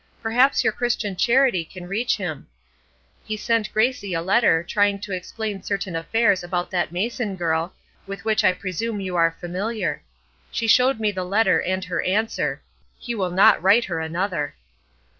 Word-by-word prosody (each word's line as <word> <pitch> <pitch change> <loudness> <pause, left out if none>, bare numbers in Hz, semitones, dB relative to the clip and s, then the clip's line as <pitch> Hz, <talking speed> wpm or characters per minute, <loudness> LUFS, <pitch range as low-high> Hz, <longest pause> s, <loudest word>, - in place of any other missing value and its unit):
Perhaps 245 +4 +3
your - - +2
Christian 235 -5 -1
charity 240 -4 +3
can 175 +2 -11
reach 220 +6 0
him. 175 -8 -5 0.8
He 215 - -4
sent 225 0 0
Gracie 215 -5 0
a 165 - -1
letter, 190 -4 +3
trying 205 +2 +1
to 205 - -7
explain 200 +2 -4
certain 195 -3 -3
affairs 195 +3 +1
about 175 0 -3
that 180 -3 -1
Mason 210 +3 -2
girl, 165 -1 -1 0.3
with 195 +2 -7
which 215 -1 +2
I 185 - +4
presume 200 +4 -4
you 185 -2 -4
are 165 -1 +2
familiar. 195 +6 -3 0.5
She 230 - -2
showed 250 +2 +4
me 215 -1 +1
the 185 -2 -4
letter 185 -2 +2
and 185 0 -2
her 180 - -2
answer. 215 +4 -1 0.3
He 240 - -5
will 190 -5 -1
not 180 -1 +5
write 200 +6 +4
her 170 -3 -3
another! 160 -1 -2
195 Hz, 165 wpm, -23 LUFS, 180-225 Hz, 0.8 s, not